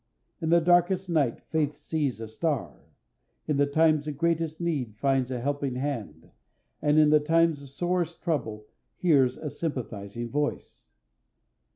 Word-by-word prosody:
In 160 - -1
the 170 +1 +6
darkest 175 +2 +2
night 145 -8 +1
faith 150 -2 0
sees 145 -7 -2
a 115 - -6
star, 110 - -2 0.7
in 150 -2 +1
the 145 0 +3
times 155 0 +3
of 150 -2 -4
greatest 165 0 0
need 145 -11 -2
finds 135 0 +1
a 125 -2 -3
helping 140 0 -2
hand, 105 - -5 0.5
and 150 +1 +3
in 155 -1 +6
the 150 - +6
times 165 0 +2
of 140 - -11
sorest 175 +3 -2
trouble 110 -11 -2 0.3
hears 135 -8 +3
a 150 - -5
sympathizing 120 -7 -5
voice. 145 +1 -3
145 Hz, 150 wpm, -27 LUFS, 130-165 Hz, 0.7 s, the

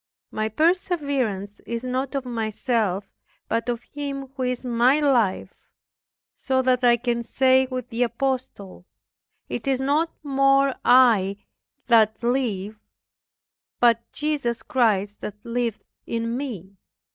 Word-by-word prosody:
My 215 0 -2
perseverance 280 - 0
is 235 0 -4
not 260 +2 -2
of 270 -2 -2
myself, 220 -4 -1 0.4
but 230 +2 -1
of 240 0 -2
Him 275 -2 -6
who 265 - -5
is 250 0 -2
my 245 +4 +3
life; 245 -10 +1 0.9
so 260 -1 0
that 255 0 +2
I 240 -1 +5
can 240 0 -1
say 260 +2 +3
with 255 -2 -5
the 230 +2 -3
apostle, 235 -6 -3 0.6
"It 240 - -5
is 265 -2 +1
no 290 +5 +1 0.2
more 275 -1 +3
I 225 -6 +5 0.5
that 220 -1 +3
live, 220 -5 -1 1.0
but 235 -1 +4
Jesus 285 -6 -2
Christ 210 -5 +1
that 210 - -5
liveth 235 -2 -2 0.2
in 230 0 -2
me." 200 -8 -6
245 Hz, 120 wpm, -24 LUFS, 220-270 Hz, 1.0 s, I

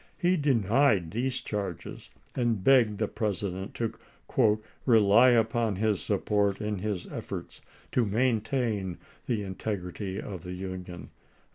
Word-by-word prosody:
He 180 0 +2
denied 120 - +2
these 125 +3 -1
charges, 100 -6 -5 0.3
and 115 -6 0
begged 120 -5 +5
the 110 - 0
President 100 -3 -3
to 115 -2 -1 1.0
"rely 115 +1 +6
upon 115 -2 +2
his 105 0 +1
support 100 -2 +1
in 105 -2 -2
his 100 -2 -3
M« - - -11
efforts - - -6 0.3
to 125 - +2
maintain 110 -3 0 0.3
the 110 -4 0
integrity 95 0 -4
of 95 -5 -6
the 90 0 -6
Union." 90 -1 -7
105 Hz, 125 wpm, -28 LUFS, 95-120 Hz, 1.0 s, rely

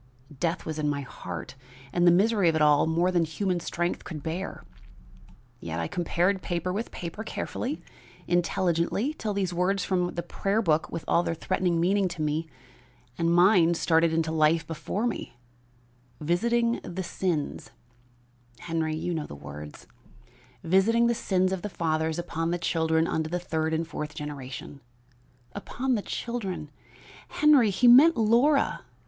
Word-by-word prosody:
Death 170 +4 -1
was 155 -1 -4
in 150 -1 0
my 145 -1 -1
heart 90 -10 -7 0.4
and 175 0 +3
the - - +8
misery 200 0 +3
of 160 - 0
it 160 - +1
all 150 0 +4
more 170 +3 +2
than 175 -2 +2
human 180 +3 -1
strength 175 +1 -2
could 155 -4 -7
bear; 175 +5 -4 1.0
yet 85 -3 -5
I 85 - -1
compared 180 - 0
paper 175 0 -2
with 220 +4 -3
paper 175 +5 -6
carefully, 260 +5 -4 0.4
intelligently, 175 - 0
till 215 -8 -4
these 190 -3 -1
words 180 +2 0
from 180 -2 0
the 170 - -3
prayer 195 +4 -1
book 160 -7 +1
with 165 - -5
all 170 - +3
their 165 - -2
threatening 180 0 0
meaning 190 +3 +2
to 175 -2 -6
me 155 +2 -1 0.7
and 165 0 +2
mine 175 -1 +5
started 165 0 +3
into 160 0 0
life 160 +1 +2
before 165 +7 -3
me: 225 - -4 0.8
'Visiting 235 +9 +1
the 185 +2 -5
sins 170 -4 -3 0.4
' 120 0 -32
Henry, 160 -2 -1
you 175 +3 -2
know 155 -2 -3
the - - -9
words 75 +1 -10 0.8
'Visiting 195 +7 +3
the 235 - +3
sins 185 -4 0
of 190 -2 -2
the 210 - -4
fathers 160 -2 -1
upon 165 -1 -2
the 175 - 0
children 160 -1 +1
unto 160 -2 -1
the 175 - -1
third 160 -2 -2
and 160 +1 -1
fourth 150 -2 -6
generation.' 140 -2 -7 0.7
Upon 260 +1 -2
the 220 - 0
children! 190 -11 -4 0.6
Henry, 290 -7 +4
he 205 +6 +3
meant 280 +8 +8
Laura! 240 +7 +3
170 Hz, 160 wpm, -27 LUFS, 160-195 Hz, 1.0 s, the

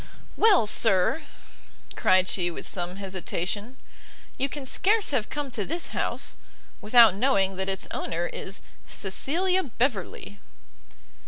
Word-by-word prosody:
"Well, 410 - +5
sir," 210 - +2 0.7
cried 185 0 +3
she 175 -2 +1
with 170 - -7
some 180 0 -4
hesitation, 195 +4 -4 0.6
"you 275 - -2
can 285 -1 -7
scarce 415 +9 +2
have 245 -6 0
come 290 -2 -4
to 215 -4 -2
this 335 - -2
house, - - -2 0.4
without 225 -1 +6
knowing 195 -4 +1
that 190 0 -1
its 190 0 0
owner 170 +1 -3
is 195 +2 -5 0.2
Cecilia 350 - +1
Beverley." 220 - -3
210 Hz, 120 wpm, -26 LUFS, 190-275 Hz, 0.7 s, without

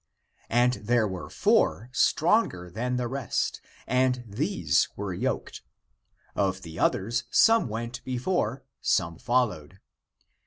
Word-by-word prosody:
But 125 +1 +2
there 115 0 +2
were 95 -2 -6
four 115 +5 +1
stronger 145 - +2
than 125 +6 -2
the 125 -1 -1
rest, 130 -3 -2 0.2
and 125 -1 +1
these 105 - +1
were - - -4
yoked. - - -3 0.7
Of 95 -2 -1
the 80 0 -8
others, 120 +5 0
some 225 - +5
went 115 +3 -5
before, 130 - -1 0.2
some 85 0 0
followed. 105 -9 -1
120 Hz, 115 wpm, -27 LUFS, 95-125 Hz, 0.7 s, some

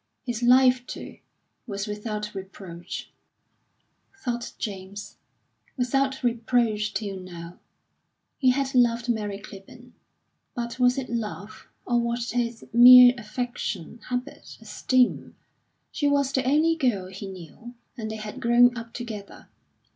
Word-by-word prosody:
His 240 -2 -3
life, 250 0 +5
too, - - -8 0.5
was 200 -2 -4
without 210 0 -5
reproach, 190 -3 -8 1.1
thought 240 -9 -4
James 200 0 -7 0.6
without 265 +2 0
reproach 230 -3 +1
till 200 -3 -3
now.... 175 -1 -10 0.8
He 260 - +4
had 270 +1 0
loved 240 -1 +2
Mary 210 -3 -1
Clibborn. 215 +5 -13 0.6
But 235 +1 -5
was 250 +1 +4
it 265 -2 -3
love, 215 -3 -6 0.2
or 240 -1 +2
was 235 0 -2
it 235 -2 -3
merely 250 +1 +10
affection, 235 -3 -5
habit, 250 +3 -5
esteem? 255 -1 0 0.6
She 290 - 0
was 280 -1 +2
the 265 -2 0
only 310 +5 +3
girl 245 - 0
he 195 +1 -8
knew, 190 +6 -11 0.2
and 220 -4 -5
they 220 - -5
had 215 -1 -7
grown 240 +1 +5
up 230 -1 -8
together. 220 -5 -8
235 Hz, 125 wpm, -25 LUFS, 210-250 Hz, 1.1 s, merely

